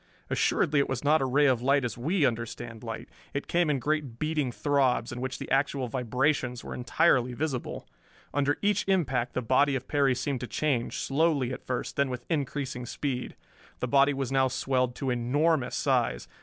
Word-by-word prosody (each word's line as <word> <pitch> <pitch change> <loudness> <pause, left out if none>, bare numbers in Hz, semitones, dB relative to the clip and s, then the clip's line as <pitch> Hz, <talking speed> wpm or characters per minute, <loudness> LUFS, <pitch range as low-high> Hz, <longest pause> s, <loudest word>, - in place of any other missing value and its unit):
Assuredly 145 -1 +2
it 140 - +1
was 130 0 -2
not 150 +1 +4
a - - +1
ray 145 +3 +3
of 130 -4 +3
light 135 +1 +3
as 120 - -3
we 155 +6 +1
understand 115 -1 -3
light. 115 -1 -6 0.3
It 140 - -2
came 170 -2 +1
in 145 - +2
great 145 -2 -2
beating 155 -3 -1
throbs, 135 -3 +1
in 120 +1 -5
which 130 0 -3
the - - -8
actual 135 -1 +1
vibrations 125 +1 0
were - - -6
entirely 125 -1 +2
visible. 135 -3 -3 0.5
Under 145 +1 +1
each 205 0 +2
impact 130 -11 +1
the 125 - -2
body 135 +4 +3
of 130 -1 -4
Perry 140 -3 +2
seemed 135 +1 -2
to 125 - -5
change, 135 -5 -1
slowly 140 -3 +1
at - - -9
first, 125 +3 -3
then 140 -2 +2
with 125 -1 -5
increasing 135 -4 -2
speed. 130 -2 -3 0.4
The 125 - -1
body 140 +2 +4
was 135 -2 -3
now 135 -1 +3
swelled 130 -1 0
to 135 -3 -2
enormous 135 +4 +1
size. - - 0
135 Hz, 185 wpm, -28 LUFS, 125-145 Hz, 0.5 s, not